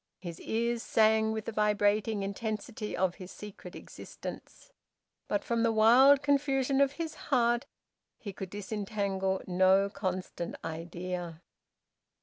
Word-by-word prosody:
His 170 -3 -8
ears 235 +1 -1
sang 220 -1 +3
with 220 -1 -4
the - - -3
vibrating 210 0 +1
intensity 215 +2 -4
of 185 -1 +1
his 180 - -8
secret 210 0 -10
existence, - - -10 0.6
but - - -1
from 235 -4 0
the 230 0 +3
wild 255 +6 +6
confusion 275 -1 +2
of 280 0 +3
his 325 -1 -4 0.2
heart 240 -1 +2 0.5
he 200 -4 -7
could 190 0 -7
disentangle 200 -2 -2
no 190 +2 +3
constant 185 -2 -4
idea. 170 +1 -5
210 Hz, 125 wpm, -30 LUFS, 190-235 Hz, 0.6 s, wild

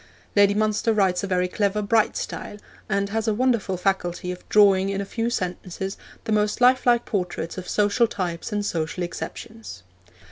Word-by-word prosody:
Lady 200 0 +5
Munster 215 +1 +1
writes 190 -3 +2
a - - -1
very 180 -1 +1
clever, 200 +2 0
bright 220 +1 +2
style, 205 - -5 0.3
and 200 0 0
has 220 +2 -2
a 215 - +2
wonderful 230 -6 +1
faculty 180 -1 -1
of 180 - -10
drawing 195 -2 +5
in 195 0 -2
a 200 - -2
few 230 +3 -2
sentences 190 -1 -4 0.3
the - - -4
most 210 0 +1
lifelike 245 -1 +4
portraits 180 -5 -3
of 185 -1 -7
social 210 +3 +2
types 180 -2 -4
and 205 -1 -1
social 165 -1 -2
exceptions. 220 - -7
200 Hz, 170 wpm, -24 LUFS, 185-215 Hz, 0.3 s, Lady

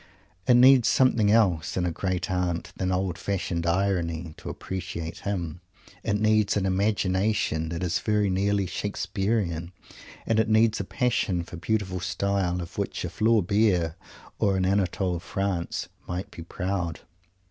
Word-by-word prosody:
It 125 - +6
needs 125 0 +7
something 120 -5 +4
else 95 -9 +2
in 90 - +1
a 90 - 0
Great 90 +1 -2
Aunt 90 -2 -1
than 95 0 -1
old 90 -2 -1
fashioned 85 -4 -2
irony 85 -3 0
to - - -7
appreciate 90 -3 -5
him. 90 -5 -4 0.4
It 105 -1 0
needs 110 -1 +3
an 100 - 0
imagination 95 -3 +1
that 85 +2 -4
is 85 -2 0
very 105 -2 +1
nearly 100 +1 +1
"Shakespearean" 95 -2 -2 0.5
and 110 -1 +2
it 110 0 +2
needs 110 0 +4
a 100 - -2
passion 95 -3 0
for 85 - -10
beautiful 95 0 -1
style 90 0 -1
of 85 - -8
which - - -2
a - - -5
Flaubert 100 -5 +2 0.5
or 100 -2 +2
an 95 - +1
Anatole 95 -2 0
France 95 -1 -2 0.2
might 95 +4 -4
be 85 - -9
proud. 90 0 -3
95 Hz, 145 wpm, -26 LUFS, 85-105 Hz, 0.5 s, needs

